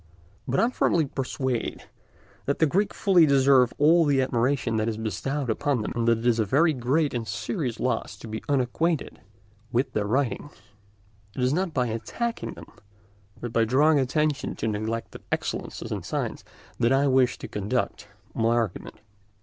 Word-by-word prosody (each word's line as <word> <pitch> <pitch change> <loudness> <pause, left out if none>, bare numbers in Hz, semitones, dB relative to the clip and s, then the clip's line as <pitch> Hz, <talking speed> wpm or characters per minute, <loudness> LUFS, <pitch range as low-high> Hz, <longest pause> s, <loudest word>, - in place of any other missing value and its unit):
But 135 +1 +1
I - - +4
am 240 - +2
firmly 170 -9 +2
persuaded 130 -2 -3 0.6
that 140 - +1
the 160 - +4
Greeks 195 +7 0
fully 180 -6 +5
deserve 135 -3 +5
all 165 +4 +5
the 145 -3 +2
admiration 125 -2 +1
that 110 +1 0
is 110 - -3
bestowed 125 +6 -3
upon 135 -1 0
them, - - -4
and 120 -1 0
that 115 -1 +4
it 115 - -6
is 120 -2 +3
a - - +4
very 150 - +3
great 140 +4 +1
and 115 -2 -3
serious 135 - -3
loss 125 - -2
to - - -10
be 110 0 -5
unacquainted 145 +4 0 0.5
with 130 +2 0
their 105 -1 0
writings. 135 +4 -1 0.8
It 125 - -2
is 130 +2 +2
not 180 0 -1
by 125 -2 +2
attacking 230 - -3
them, - - -13 0.7
but 120 -1 -6
by 115 - +3
drawing 145 +6 +4
attention 145 +2 0
to - - -3
neglected 110 +2 -3
excellences - - -3
in - - -2
science, - - -3 0.4
that 115 - +3
I 135 +1 +3
wish 130 -2 +3
to - - -7
conduct 105 0 -2 0.3
my 115 +1 +2
argument. 115 -3 -2
130 Hz, 175 wpm, -26 LUFS, 115-145 Hz, 0.8 s, fully